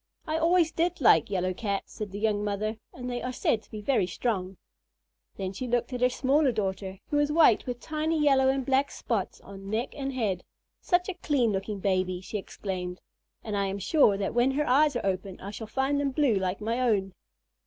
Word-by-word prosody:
"I 310 - -2
always 330 0 +3
did 345 +2 0
like 165 - +5
yellow 185 -2 0
Cats," 200 0 -3
said 210 -3 -5
the 200 - -6
young 210 -1 0
mother, 210 +2 -2
"and 250 0 -7
they 245 -1 -3
are 250 - -3
said 230 -3 0
to - - -25
be 215 - -7
very 210 -5 +2
strong." 190 -2 -2 0.8
Then 190 -1 -3
she 250 +6 -4
looked 245 +2 0
at 250 - -3
her 250 - +5
smaller 270 +2 +2
daughter, 195 -3 -3
who 295 - +2
was 290 0 +2
white 300 -9 +5
with 245 -1 -3
tiny 310 +2 -1
yellow 270 -3 +4
and 265 -1 0
black 270 +1 +2
spots 220 -6 -3
on 195 0 -10
neck 225 +5 -2
and 275 -1 -3
head. 210 -8 -1 0.4
"Such 355 -1 +2
a 380 - -2
clean 285 -9 +1
looking 195 +1 -3
baby," 185 -2 0
she 205 +3 -5
exclaimed, 185 -2 -5 0.4
"and 215 -2 -3
I 200 -1 +1
am 195 +1 -3
sure 200 - +3
that 195 - -2
when 240 +2 +3
her 295 +2 0
eyes 285 +3 +4
are 240 - -2
open 190 0 -2
I 200 - -7
shall 220 +1 -7
find 270 +5 0
them 285 -1 +1
blue 270 -2 +2
like 190 0 -1
my 230 +3 -1
own." 205 -7 +1
225 Hz, 215 wpm, -28 LUFS, 195-275 Hz, 0.8 s, like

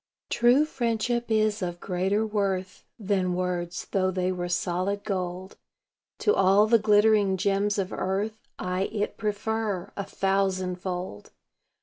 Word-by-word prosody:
True 245 +5 +4
friendship 240 -3 -1
is 215 -1 +2
of 175 -1 -3
greater 190 +4 0
worth 195 -3 -2
Than 190 -4 0
words, 180 -1 -2
though 185 -1 +2
they 185 0 0
were 175 -1 -3
solid 185 +3 -1
gold. 185 -2 -4 0.6
To 420 - +4
all 195 +2 +5
the 230 +1 +4
glittering 210 -2 +4
gems 200 +2 +1
of 190 -2 -2
earth 205 +4 -2 0.2
I 185 +1 -1
it 205 -1 -2
prefer, 210 -2 -2
a 200 - -3
thousandfold. 185 - -2
195 Hz, 125 wpm, -26 LUFS, 185-215 Hz, 0.6 s, all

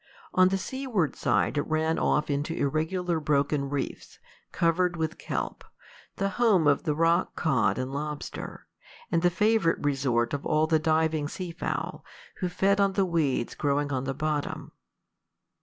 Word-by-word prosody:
On 185 0 +6
the 195 +1 +1
seaward 230 - -2
side 150 - +1
it - - -2
ran 160 +1 +1
off 150 0 +1
into 145 +3 -1
irregular 160 +4 0
broken 145 -1 +1
reefs, 140 -1 -4 0.3
covered 175 +1 +1
with 160 0 -2
kelp, - - -4 0.5
the 195 0 0
home 200 -9 +4
of 145 +2 +3
the 150 -2 +1
rock 165 +2 +2
cod 130 -9 +1
and 130 +1 -3
lobster, 150 +1 -5 0.5
and 165 - +2
the 175 - +4
favorite 210 -1 +2
resort 130 -4 +1
of 145 - -2
all 155 0 +2
the 160 0 +2
diving 160 -1 +1
sea 180 +3 -5
fowl, - - -4 0.3
who 180 - -2
fed 200 +3 +2
on 195 -1 +2
the 195 0 +2
weeds 155 -9 0
growing 145 0 0
on 130 0 -1
the 135 0 -2
bottom. 150 0 -3
160 Hz, 155 wpm, -27 LUFS, 145-180 Hz, 0.5 s, On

